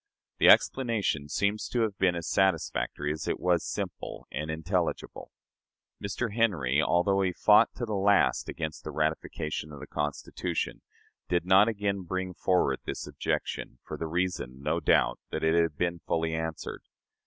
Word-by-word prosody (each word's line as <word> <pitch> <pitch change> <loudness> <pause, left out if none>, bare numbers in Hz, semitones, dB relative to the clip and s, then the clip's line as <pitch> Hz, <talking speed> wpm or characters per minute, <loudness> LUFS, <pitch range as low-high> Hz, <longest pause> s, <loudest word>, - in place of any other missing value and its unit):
The - - +5
explanation 105 - +3
seems 100 +5 0
to 120 - 0
have 110 -3 0
been 90 -2 +3
as 85 -1 -4
satisfactory 80 -5 0
as 75 0 -5
it - - -1
was 90 -2 +2
simple - - -5
and 75 +1 -4
intelligible. 80 0 -2 0.7
Mr. 100 +3 -2
Henry, 80 - +2
although 95 +4 +2
he 95 -1 +1
fought 105 +5 +5
to 120 - -3
the 110 - -4
last 100 0 +3
against 80 -2 -5
the - - -6
ratification 75 0 -2
of 75 - -9
the - - -8
Constitution, 75 -1 -3 0.5
did 90 -1 +1
not 95 +3 +6
again 100 -3 -1
bring 95 +1 -3
forward 90 0 +1
this - - -5
objection, - - -3
for - - -6
the 80 - -4
reason, 80 -6 -2
no - - 0
doubt, - - +3
that - - -3
it 80 0 +3
had 85 -3 +2
been 85 -1 -1
fully 80 0 -1
answered. 80 0 -4
90 Hz, 160 wpm, -28 LUFS, 80-100 Hz, 0.7 s, not